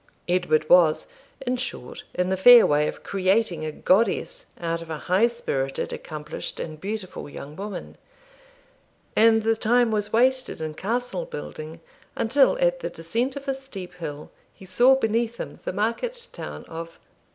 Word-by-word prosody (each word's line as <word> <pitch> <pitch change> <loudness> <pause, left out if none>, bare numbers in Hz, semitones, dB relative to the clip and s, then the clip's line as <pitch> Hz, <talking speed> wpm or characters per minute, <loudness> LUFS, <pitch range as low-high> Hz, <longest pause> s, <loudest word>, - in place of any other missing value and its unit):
Edward 175 -4 +1
was, 165 -3 +5 0.4
in 255 -1 -1
short, 245 - -6
in 180 0 0
the 190 - +1
fair 240 +5 +9
way 150 +1 +2
of - - -6
creating 190 -3 +1
a 155 - -3
goddess 235 - +1
out 165 -1 -2
of 165 - -10
a 160 - -3
high 185 +9 +3
spirited, 135 - -3
accomplished, 150 -1 -6
and 155 -1 -6
beautiful 195 -6 -5
young 145 +1 -9
woman; 200 0 -7 1.2
and 225 0 +5
the 225 +1 +2
time 235 +1 +3
was 210 -1 -1
wasted 255 0 +2
in 155 -1 -4
castle 245 - -2
building 165 - -8 0.3
until, 270 - +3
at - - +2
the - - -4
descent 230 - -2
of 280 0 -8
a 270 - +1
steep 265 -9 -8
hill, 150 -4 -7 0.2
he 190 - -15
saw 245 +8 +5
beneath 230 -1 0
him - - -7
the - - -1
market 465 - -2
town - - -7
of 165 0 -8
205 Hz, 160 wpm, -25 LUFS, 165-245 Hz, 1.2 s, fair